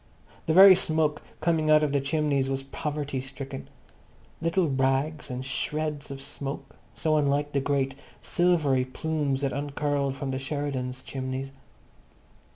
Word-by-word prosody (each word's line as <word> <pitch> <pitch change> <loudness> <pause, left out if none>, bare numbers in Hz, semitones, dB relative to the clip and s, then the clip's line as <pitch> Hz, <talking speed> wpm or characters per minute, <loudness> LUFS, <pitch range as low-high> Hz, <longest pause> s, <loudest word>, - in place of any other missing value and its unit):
The 160 - +3
very 190 +1 +11
smoke 155 -4 +2 0.2
coming 160 -2 +1
out 155 0 +6
of 150 - +1
their 140 -1 +1
chimneys 140 -2 +1
was 135 0 -2
poverty 145 -1 -3
stricken. 135 0 -8 0.7
Little 165 +1 +2
rags 135 +3 0
and 125 +1 -4
shreds 150 +2 -3
of 140 0 -6
smoke, 140 -1 -6 0.2
so 155 -1 +1
unlike 145 0 +1
the 140 - +1
great 135 -1 0 0.3
silvery 150 -2 +2
plumes 140 0 -2
that 140 -1 0
uncurled 140 -1 -1
from 135 0 -3
the 130 - -2
Sheridans' 135 -2 -3
chimneys. 130 0 -4
140 Hz, 140 wpm, -27 LUFS, 135-155 Hz, 0.7 s, very